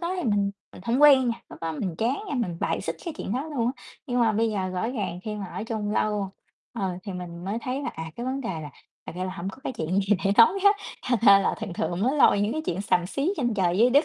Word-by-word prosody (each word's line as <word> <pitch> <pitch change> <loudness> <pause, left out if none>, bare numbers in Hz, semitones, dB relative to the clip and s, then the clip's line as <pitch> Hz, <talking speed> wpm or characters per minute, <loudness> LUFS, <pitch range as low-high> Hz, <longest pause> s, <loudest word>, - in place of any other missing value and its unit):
đó 350 +2 -2
thì 355 - -2
mình 205 -3 +2 0.2
mình - - -12
hổng 240 +6 +1
quen 270 -4 +7
nha, 235 0 -3
lúc - - -11
đó 165 -1 -2
mình 170 +3 -3
chán 240 +5 +1
nha, - - -2
mình 225 -10 -1
bài - - 0
xích - - -4
cái 335 -3 -4
chuyện - - -4
đó 260 +5 -1
luôn 275 -7 -1
á. - - -18 0.2
Nhưng 245 -2 0
mà 225 -2 +4
bây 225 +1 +1
giờ 190 -3 -1
rõ 185 +4 -2
ràng 205 -8 -3
khi 215 - -3
mà 200 -2 -5
ở 205 - -5
chung 215 -2 -3
lâu, 210 -2 0 0.4
ờ, 190 -6 -2
thì 200 - -6
mình 175 -1 -7
mới 200 +4 -2
thấy 260 +3 -2
là, - - -2
à, 160 0 -6
cái 240 - -4
vấn 265 +1 -2
đề 240 - -4
là 155 -5 -5 0.4
thật - - -6
ra 185 - -2
là 185 - -3
hổng 175 +3 -4
có 195 - -7
cái - - -2
chuyện 190 -4 0
gì 200 +1 +2
để 195 - +3
nói 235 +12 +7
hết. 405 0 +6 0.3
Thành 245 -2 +1
ra 200 -3 +8
là 195 - +1
thường 215 -5 -4
thường 175 +1 -2
mới 260 +6 +2
lôi 235 -7 +5
những 205 +2 +1
cái 315 - -2
chuyện 180 - -2
xàm 180 -3 +1
xí 280 - -1
trên 240 -7 0
trời 180 -2 +1
dưới 240 +3 +6
đất 285 +5 +5
215 Hz, 295 wpm, -26 LUFS, 185-250 Hz, 0.4 s, ra